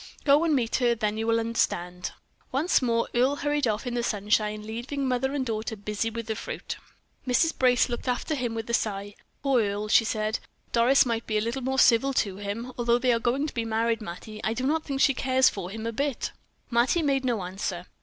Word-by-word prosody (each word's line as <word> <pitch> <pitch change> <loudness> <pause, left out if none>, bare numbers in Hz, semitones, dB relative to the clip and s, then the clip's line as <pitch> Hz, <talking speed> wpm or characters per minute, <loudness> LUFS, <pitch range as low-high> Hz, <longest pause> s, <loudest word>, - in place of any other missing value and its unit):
Go 290 +2 +5
and 320 -3 +3
meet 235 -4 +1
her; 240 -2 +2
then 215 -1 -1
you 225 - -2
will 230 0 +3
understand." 180 -6 -1 0.4
Once 285 +6 +2
more 230 -2 +1
Earle 255 +4 +3
hurried 290 -2 0
off 215 +3 -1
in 245 - -3
the 240 - 0
sunshine, 210 -1 0
leaving 245 +5 -3
mother 255 +1 0
and 270 -2 -1
daughter 220 -1 -3
busy 210 +2 -2
with 230 0 -5
the 220 0 -2
fruit. - - -5 0.5
Mrs. 260 +6 +3
Brace 250 -2 +4
looked 245 +1 -5
after 250 +5 -1
him 245 -5 -2
with 225 0 -4
a 235 - -3
sigh. 205 -3 -1 0.3
"Poor 270 -4 +3
Earle," 205 0 -2
she 225 - +6
said. 215 0 -1 0.3
"Doris 245 +4 +5
might 230 -1 -2
be 215 - 0
a - - +1
little 235 +4 -2
more 265 +1 -1
civil 270 +1 +5
to 195 -6 0
him. 210 +5 -5
Although 235 0 +3
they 250 0 +2
are 230 - +1
going 250 +5 0
to 305 - -5
be 230 - -1
married, 225 0 0
Mattie, 215 +3 -8
I 220 - 0
do 255 +2 -2
not 310 +3 +1
think 275 -1 -2
she 275 - +5
cares 260 0 +3
for 185 -3 -6
him 220 +3 -6
a 230 - -1
bit." 275 +2 -2 0.4
Mattie 245 +8 +3
made 275 -2 +1
no 235 -6 0
answer. 180 -1 -4
235 Hz, 225 wpm, -27 LUFS, 215-260 Hz, 0.5 s, she